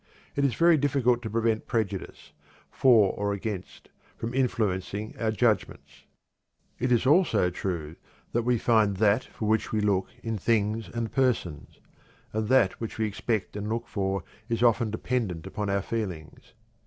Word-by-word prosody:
It 140 - +1
is 135 -5 +2
very 170 +2 +5
difficult 125 -4 +2
to 110 - -5
prevent 115 0 0
prejudice, 105 -5 -3 0.4
for 110 -7 +5
or 100 0 -1
against, 100 -2 -6 0.3
from 115 +2 -4
influencing 110 -5 -1
our 115 - 0
judgments. 110 -3 -1 0.7
It 125 +1 0
is 120 +1 +3
also 145 - +4
true 85 -4 -4 0.4
that 120 - +1
we 120 +1 +1
"find 110 -4 +2
that 105 +4 +3
for 110 - -5
which 110 0 +1
we 110 - +1
look" 100 -2 +1 0.2
in 115 -2 -3
things 110 +1 0
and 115 -1 -3
persons, 125 - -1 0.5
and 110 0 -1
that 120 -6 +3
which 115 - -5
we 110 - +1
expect 110 0 -2
and 105 +1 -4
look 115 +1 -2
for 95 -2 -2 0.3
is 115 0 0
often 115 -1 +3
dependent 105 -6 -2
upon 100 +1 -3
our 100 -1 0
feelings. 95 -10 -5
110 Hz, 155 wpm, -27 LUFS, 100-120 Hz, 0.7 s, very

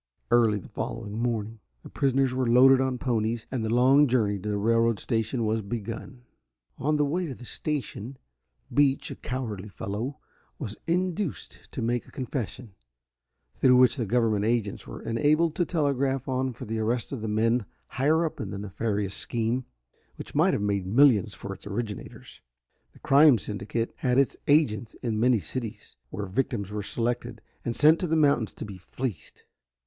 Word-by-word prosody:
Early 115 -3 +4
the 95 - -9
following 105 +1 -5
morning 115 -2 -2 0.2
the - - -10
prisoners 135 -1 +1
were 130 -2 0
loaded 130 +2 +7
on 130 -1 0
ponies, 115 -2 -1
and 125 -4 -2
the 110 - -1
long 130 +5 +5
journey 110 -5 +1
to 105 - -5
the 105 - 0
railroad 115 +1 +2
station 115 +3 -1
was 110 +1 0
begun. 115 +3 -6 0.6
On 150 +3 +1
the 145 - +3
way 170 +5 -1
to 135 - -6
the 125 - -12
station, 135 -3 -4 0.6
Beach, 140 -1 +2
a - - -5
cowardly 110 -6 -5
fellow, 110 +8 -4 0.4
was 105 - -5
induced 180 0 -2
to 125 - -3
make 120 +1 -1
a - - -16
confession, 125 -3 -5 0.8
through 125 -1 +5
which 125 -1 +5
the 120 -6 -2
government 110 -2 +2
agents 110 -2 -1
were - - -8
enabled 150 +7 +2
to 175 - +2
telegraph 140 -5 0
on 130 0 0
for 120 - -9
the 110 +1 -3
arrest 115 +4 -1
of 130 - -4
the 110 - -3
men 115 +1 +1 0.2
higher 155 +6 +1
up 160 - -4
in 105 - -4
the 100 - -5
nefarious 100 0 -2
scheme, 120 +3 -1 0.5
which - - -9
might - - +3
have - - -2
made 100 -2 0
millions 115 -2 +4
for 100 - -6
its 95 - -12
originators. 105 0 -6 0.5
This - - -21
crime 140 -1 +6
syndicate 105 +3 -3
had 125 -1 +1
its 135 -1 +3
agents 120 -7 +2
in 110 -3 -1
many 120 0 +4
cities, 110 +4 -6
where 100 - -4
victims 105 0 -2
were 105 0 -3
selected 120 +2 -2 0.2
and 115 - -2
sent 155 +2 +5
to 180 - -1
the 160 - +1
mountains 140 -7 +3
to - - -7
be 100 -3 -9
fleeced. 115 +1 -6
120 Hz, 175 wpm, -27 LUFS, 105-135 Hz, 0.8 s, loaded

